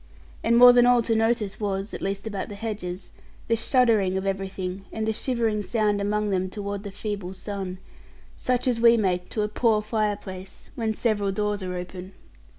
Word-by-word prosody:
And 235 +1 +3
more 245 0 +10
than 245 0 +6
all 245 -1 +5
to 225 - +1
notice 225 -3 +1
was 200 -1 -2
(at - - -6
least 195 +1 -3
about 205 -3 -4
the 205 - -7
hedges) 200 -4 -5 0.4
the 230 - +3
shuddering 225 -6 +2
of 190 - -3
everything 195 -1 -3
and 220 0 -3
the 220 - +1
shivering 230 -3 0
sound 210 -1 0
among 210 +1 0
them 185 -1 0
toward 200 0 -4
the 205 - -7
feeble 195 -2 -5
sun; 190 -2 -5 0.6
such 250 0 -1
as 235 -2 +1
we 235 0 +7
make 180 -4 0
to 215 - -1
a - - 0
poor 215 0 +2
fireplace 205 -3 -4
when 225 -5 -2
several 205 -4 0
doors 210 +1 -1
are 180 -1 -4
open. 180 +1 -7
210 Hz, 185 wpm, -25 LUFS, 195-225 Hz, 0.6 s, more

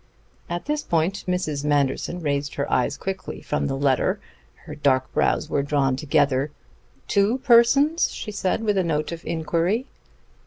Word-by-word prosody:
At 175 0 -4
this 300 +1 -1
point 170 - 0
Mrs. 155 -6 -1
Manderson 145 +4 0
raised 140 -2 -2
her 140 - -2
eyes 130 +3 +1
quickly 190 +4 -5
from 150 - -2
the 135 -1 -2
letter. 135 -2 +1 0.5
Her - - -7
dark 130 -3 +1
brows - - +1
were 140 - 0
drawn 140 -2 +1
together. 140 -1 +1 0.6
"Two 200 +5 +2
persons?" 275 +5 +4
she 215 - -6
said 205 +2 -1
with 210 -3 +1
a - - +2
note 155 -2 -1
of 170 0 -7
inquiry. 170 +8 0
160 Hz, 155 wpm, -23 LUFS, 140-200 Hz, 0.6 s, persons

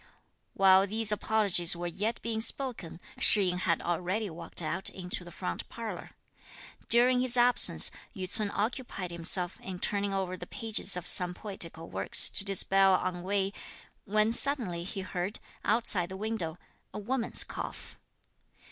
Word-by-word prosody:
While 195 0 +4
these 220 +1 +3
apologies 200 -5 +2
were 175 +1 -7
yet 200 +7 -3
being 225 -1 -2
spoken, 230 -10 +1 0.2
Shih 200 -3 +6
yin 180 - -3
had 170 -3 -1
already 180 +4 -3
walked 170 +1 -2
out 175 +3 -3
into 180 -1 -5
the 175 - -12
front 90 - -6
parlour. 230 -2 -8 0.7
During 250 +1 +4
his 250 -1 +5
absence, 245 +1 +4 0.2
Yü 185 -2 -5
ts'un 210 +2 -3
occupied 210 -4 -4
himself 175 +2 +1
in 185 -1 -8
turning 200 +2 -1
over 190 -2 -3
the 175 -1 -10
pages 210 -4 -2
of 180 - -7
some 180 -1 -1
poetical 170 -6 -5
work 95 +1 -7
to - - +7
dispel 195 -1 +2
ennui, 190 +2 -3 0.5
when 215 +2 +1
suddenly 230 -10 +3
he 195 +1 -6
heard, 185 +1 -5 0.2
outside 210 -5 0
the 190 - -8
window, 200 -6 -5 0.3
a - - -9
woman's 235 +3 +2
cough. - - -9
195 Hz, 145 wpm, -28 LUFS, 180-220 Hz, 0.7 s, to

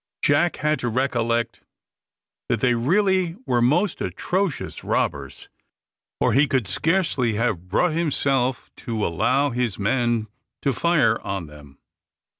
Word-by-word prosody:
Jack 155 +4 +3
had 150 -1 0
to 125 - -1
recollect 120 -1 -1 0.9
that - - +1
they 125 -1 +3
really 185 - +1
were 120 -1 +1
most 165 - +2
atrocious 185 -4 -2
robbers, - - -2 0.7
or - - +2
he 140 +3 +4
could 130 -7 0
scarcely 140 - 0
have 105 -6 -1
brought 160 - +1
himself 135 -6 0
to 110 -3 -3
allow 135 - +1
his 120 -4 -1
men 120 +2 0 0.4
to 140 - +1
fire 150 -6 +2
on 95 -3 -4
them. 75 -2 -14
125 Hz, 125 wpm, -23 LUFS, 115-155 Hz, 0.9 s, he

